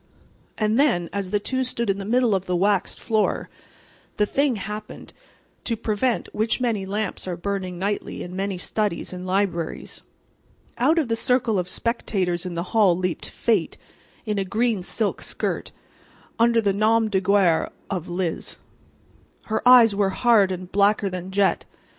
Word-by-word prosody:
And 215 Hz, +2 st, +1 dB
then, 230 Hz, -, +2 dB
as 200 Hz, -2 st, -3 dB
the 205 Hz, -, +1 dB
two 260 Hz, +5 st, -1 dB
stood 235 Hz, -2 st, -2 dB
in 195 Hz, 0 st, 0 dB
the 195 Hz, -, -5 dB
middle 240 Hz, 0 st, +2 dB
of 190 Hz, -1 st, -1 dB
the 180 Hz, -, 0 dB
waxed 195 Hz, +1 st, +1 dB
floor, 220 Hz, -2 st, 0 dB, 0.7 s
the 210 Hz, -, +3 dB
thing 275 Hz, +3 st, +1 dB
happened 210 Hz, +1 st, -7 dB, 0.5 s
to 230 Hz, -2 st, -1 dB
prevent 225 Hz, +3 st, -1 dB
which 220 Hz, +4 st, 0 dB
many 225 Hz, -6 st, -1 dB
lamps 205 Hz, -1 st, -3 dB
are 180 Hz, -2 st, -3 dB
burning 185 Hz, -1 st, -3 dB
nightly 200 Hz, +3 st, -3 dB
in 180 Hz, +1 st, -8 dB
many 195 Hz, 0 st, -2 dB
studies 200 Hz, -1 st, -2 dB
and 180 Hz, 0 st, -6 dB
libraries. 185 Hz, -4 st, -2 dB, 0.8 s
Out 295 Hz, +7 st, +3 dB
from 320 Hz, -, +3 dB
the 230 Hz, -1 st, -1 dB
circle 230 Hz, -3 st, +1 dB
of 180 Hz, -, -2 dB
spectators 185 Hz, -7 st, -1 dB
in 175 Hz, -, -5 dB
the 170 Hz, -, -2 dB
hall 200 Hz, -6 st, +4 dB
leaped 180 Hz, -2 st, -3 dB
Fate 215 Hz, -8 st, 0 dB, 0.5 s
in 210 Hz, -2 st, -1 dB
a -, -, +1 dB
green 215 Hz, +2 st, 0 dB
silk 205 Hz, +3 st, -1 dB
skirt, -, -, -3 dB, 0.7 s
under 230 Hz, 0 st, +4 dB
the 200 Hz, -2 st, +1 dB
nom 220 Hz, +2 st, +3 dB
de 195 Hz, -3 st, 0 dB
guerre 190 Hz, -4 st, +3 dB, 0.2 s
of 180 Hz, -3 st, -3 dB
"Liz." 175 Hz, -2 st, -3 dB, 0.9 s
Her 220 Hz, -, -2 dB
eyes 235 Hz, -4 st, +8 dB
were 200 Hz, -1 st, +1 dB
hard 205 Hz, -2 st, +3 dB
and 185 Hz, 0 st, -6 dB
blacker 200 Hz, 0 st, +3 dB
than 180 Hz, 0 st, -6 dB
jet. 195 Hz, 0 st, +1 dB
200 Hz, 165 wpm, -23 LUFS, 185-225 Hz, 0.9 s, eyes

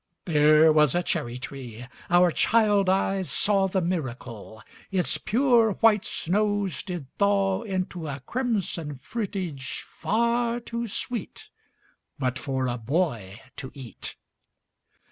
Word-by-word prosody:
There 155 Hz, -1 st, +5 dB
was 150 Hz, -2 st, +4 dB
a 175 Hz, -, +1 dB
cherry 120 Hz, -6 st, -2 dB
tree 125 Hz, -3 st, -8 dB, 0.2 s
our 175 Hz, 0 st, +5 dB
child 205 Hz, -1 st, +3 dB
eyes 190 Hz, -1 st, +1 dB
saw 195 Hz, -2 st, +2 dB
The 190 Hz, 0 st, 0 dB
miracle: 125 Hz, -, -4 dB, 0.3 s
Its 185 Hz, -3 st, +1 dB
pure 235 Hz, -2 st, +3 dB
white 215 Hz, -1 st, +3 dB
snows 205 Hz, +1 st, 0 dB
did 175 Hz, -6 st, -5 dB
thaw 200 Hz, -1 st, +2 dB
Into 185 Hz, -6 st, -3 dB
a 140 Hz, -1 st, -4 dB
crimson 190 Hz, -, -2 dB
fruitage, 175 Hz, -, -4 dB
far 235 Hz, +2 st, 0 dB
too 235 Hz, 0 st, -4 dB
sweet 230 Hz, +1 st, -5 dB, 0.7 s
But 130 Hz, -1 st, -1 dB
for 130 Hz, -1 st, -2 dB
a 125 Hz, -1 st, -2 dB
boy 115 Hz, -, -1 dB, 0.2 s
to 130 Hz, -, -6 dB
eat. 130 Hz, -5 st, -7 dB
180 Hz, 120 wpm, -26 LUFS, 135-205 Hz, 0.7 s, There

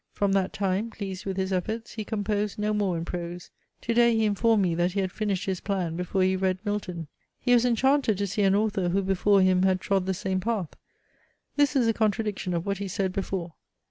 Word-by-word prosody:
From 200 Hz, -1 st, +1 dB
that 195 Hz, -1 st, +1 dB
time, 195 Hz, +3 st, -1 dB
pleased 200 Hz, -3 st, -6 dB
with 190 Hz, -1 st, -3 dB
his 190 Hz, 0 st, -1 dB
efforts, 220 Hz, +5 st, -3 dB
he 220 Hz, -, -4 dB
composed 210 Hz, -1 st, -2 dB
no 210 Hz, 0 st, 0 dB
more 200 Hz, -4 st, 0 dB
in 165 Hz, -, -4 dB
prose. 175 Hz, 0 st, -6 dB, 0.3 s
Today 235 Hz, 0 st, +3 dB
he 220 Hz, -, +2 dB
informed 210 Hz, 0 st, +3 dB
me 175 Hz, -2 st, +1 dB
that 175 Hz, +2 st, 0 dB
he 200 Hz, -, -1 dB
had 190 Hz, -1 st, -1 dB
finished 200 Hz, -3 st, -2 dB
his 190 Hz, -2 st, -2 dB
plan 185 Hz, -5 st, -2 dB
before 180 Hz, +2 st, 0 dB
he 185 Hz, 0 st, +2 dB
read 185 Hz, -1 st, 0 dB
Milton. 180 Hz, -6 st, -3 dB, 0.3 s
He 245 Hz, -, +2 dB
was 240 Hz, 0 st, +5 dB
enchanted 250 Hz, -2 st, +2 dB
to 200 Hz, -, 0 dB
see 200 Hz, +2 st, -2 dB
an 195 Hz, -1 st, +4 dB
author 205 Hz, -4 st, +1 dB
who 195 Hz, +3 st, +1 dB
before 195 Hz, +1 st, +3 dB
him 185 Hz, -1 st, +3 dB
had 190 Hz, -1 st, +3 dB
trod 190 Hz, -1 st, 0 dB
the 190 Hz, -, 0 dB
same 190 Hz, +1 st, -1 dB
path. 195 Hz, -4 st, -2 dB, 0.9 s
This 290 Hz, -2 st, +3 dB
is 255 Hz, -3 st, +3 dB
a 225 Hz, -, +3 dB
contradiction 210 Hz, -4 st, -1 dB
of 170 Hz, -, -2 dB
what 200 Hz, -1 st, -2 dB
he 200 Hz, -, -3 dB
said 190 Hz, 0 st, -1 dB
before. 185 Hz, -3 st, -3 dB
195 Hz, 220 wpm, -27 LUFS, 185-215 Hz, 0.9 s, was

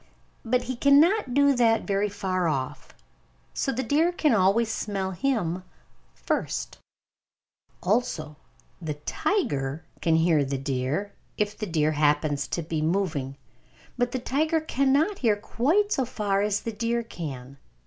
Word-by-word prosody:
But 245 Hz, +2 st, +1 dB
he 255 Hz, -, -4 dB
cannot 285 Hz, -, +4 dB
do 285 Hz, 0 st, +5 dB
that 230 Hz, -3 st, +3 dB
very 200 Hz, +1 st, 0 dB
far 185 Hz, -3 st, -1 dB
off, 135 Hz, -4 st, -3 dB, 0.6 s
so 270 Hz, -, -1 dB
the 260 Hz, +1 st, -2 dB
deer 315 Hz, +6 st, +2 dB, 0.2 s
always 205 Hz, +4 st, +3 dB
smells 190 Hz, -4 st, -3 dB
him 185 Hz, -10 st, 0 dB, 0.5 s
first! -, -, -3 dB, 1.0 s
Also, 180 Hz, -7 st, 0 dB, 0.5 s
the 155 Hz, -3 st, -3 dB
tiger 150 Hz, -, -1 dB, 0.2 s
can 165 Hz, -1 st, +3 dB
hear 160 Hz, -2 st, +3 dB
the 135 Hz, 0 st, -2 dB
deer, 135 Hz, +9 st, -2 dB, 0.2 s
if 210 Hz, 0 st, -1 dB
the 215 Hz, -, -4 dB
deer 155 Hz, -3 st, +1 dB
happens 145 Hz, -2 st, +1 dB
to 170 Hz, -, -3 dB
be 160 Hz, 0 st, -2 dB
moving. 155 Hz, -6 st, -1 dB, 0.6 s
But 245 Hz, 0 st, 0 dB
the 255 Hz, -, -1 dB
tiger 310 Hz, +6 st, 0 dB
cannot 295 Hz, +5 st, +1 dB
hear 225 Hz, -5 st, +3 dB
quite 310 Hz, -, +1 dB
so 265 Hz, -10 st, +1 dB
far 205 Hz, -4 st, -1 dB
as 205 Hz, 0 st, 0 dB
the 230 Hz, -, -4 dB
deer 235 Hz, +2 st, -1 dB
can. 140 Hz, -, -7 dB
200 Hz, 140 wpm, -26 LUFS, 155-250 Hz, 1.0 s, do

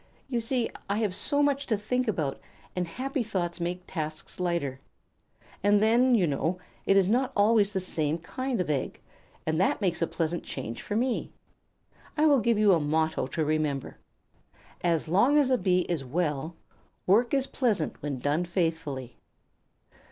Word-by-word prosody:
You 245 Hz, -3 st, -1 dB
see, 235 Hz, +1 st, 0 dB, 0.2 s
I 200 Hz, -, +1 dB
have 215 Hz, -4 st, 0 dB
so 285 Hz, +9 st, +2 dB
much 285 Hz, -1 st, +1 dB
to 220 Hz, -, +1 dB
think 250 Hz, +5 st, -1 dB
about, 155 Hz, -10 st, -1 dB, 0.4 s
and 180 Hz, -1 st, -1 dB
happy 265 Hz, -, -3 dB
thoughts 180 Hz, -6 st, -2 dB
make 175 Hz, +1 st, -3 dB
tasks 155 Hz, -1 st, -5 dB
light. 170 Hz, -7 st, -1 dB, 0.8 s
And 205 Hz, +1 st, +4 dB
then, 240 Hz, +4 st, +4 dB
you 195 Hz, -6 st, +3 dB
know, 160 Hz, +4 st, -1 dB, 0.3 s
it 195 Hz, -, +5 dB
is 190 Hz, -2 st, +4 dB
not 250 Hz, +5 st, +2 dB
always 205 Hz, 0 st, +4 dB
the 195 Hz, -, -1 dB
same 160 Hz, -4 st, -1 dB
kind 255 Hz, +8 st, -3 dB
of 180 Hz, -, 0 dB
egg, 140 Hz, -3 st, -2 dB, 0.5 s
and 160 Hz, +2 st, +1 dB
that -, -, +2 dB
makes 185 Hz, -5 st, 0 dB
a 165 Hz, -, +2 dB
pleasant 170 Hz, +1 st, -2 dB
change 115 Hz, -3 st, -6 dB
for 205 Hz, -, -4 dB
me. 245 Hz, +2 st, 0 dB, 0.9 s
I 305 Hz, -, +4 dB
will 285 Hz, -3 st, +5 dB
give 230 Hz, 0 st, +2 dB
you 210 Hz, -1 st, +5 dB
a 170 Hz, -, +3 dB
motto 155 Hz, -1 st, 0 dB
to 155 Hz, +3 st, -1 dB
remember: 150 Hz, -3 st, -1 dB, 0.8 s
'As 170 Hz, -2 st, +1 dB
long 220 Hz, -, +4 dB
as 275 Hz, -3 st, +3 dB
a 255 Hz, -, +4 dB
Bee 180 Hz, -1 st, +2 dB
is 170 Hz, -5 st, -2 dB
well, 155 Hz, +2 st, -2 dB, 0.5 s
work 230 Hz, +6 st, +4 dB
is 270 Hz, -1 st, +1 dB
pleasant 225 Hz, -, -1 dB
when 145 Hz, -3 st, -3 dB
done 145 Hz, +6 st, 0 dB
faithfully.'" 160 Hz, -8 st, -2 dB
180 Hz, 170 wpm, -28 LUFS, 160-230 Hz, 0.9 s, it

